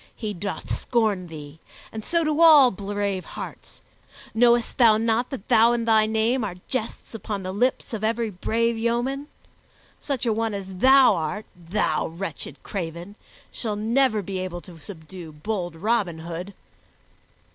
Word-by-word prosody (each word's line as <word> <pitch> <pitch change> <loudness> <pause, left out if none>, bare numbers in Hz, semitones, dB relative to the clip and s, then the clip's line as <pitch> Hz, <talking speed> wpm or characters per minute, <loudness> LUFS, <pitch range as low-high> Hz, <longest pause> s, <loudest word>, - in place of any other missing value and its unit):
He 215 -3 -4
doth 200 +2 -4
scorn 215 -6 0
thee, 150 -1 -10 0.3
and 220 -1 -6
so 335 +5 +1
do 310 +1 0
all 300 -6 +8
brave 200 -1 -3
hearts. - - -9 0.5
Knowest 235 +1 +3
thou 225 -3 +7
not 230 +2 +1
that 260 -7 -7
thou 235 0 +5
and 235 -1 -1
thy 220 -1 +4
name 225 +3 +1
are 195 -4 -4
jests 235 -3 -4
upon 205 -2 -5
the 185 - -4
lips 245 +5 0
of 215 -1 -4
every 225 0 0
brave 230 +5 0
yeoman? 240 +5 -1 0.7
Such 270 -4 -3
a 230 - +2
one 225 -1 -1
as 200 -1 -5
thou 260 +8 +5
art, 165 +7 -3
thou 175 +4 -1
wretched 170 +4 -7
craven, 175 0 -5 0.5
will 215 -3 -1
never 220 0 +2
be 190 0 -4
able 180 -1 -5
to 170 -3 -13
subdue 170 -1 -10
bold 175 +1 -4
Robin 200 -2 0
Hood." 170 +4 -7
215 Hz, 155 wpm, -24 LUFS, 185-235 Hz, 0.7 s, all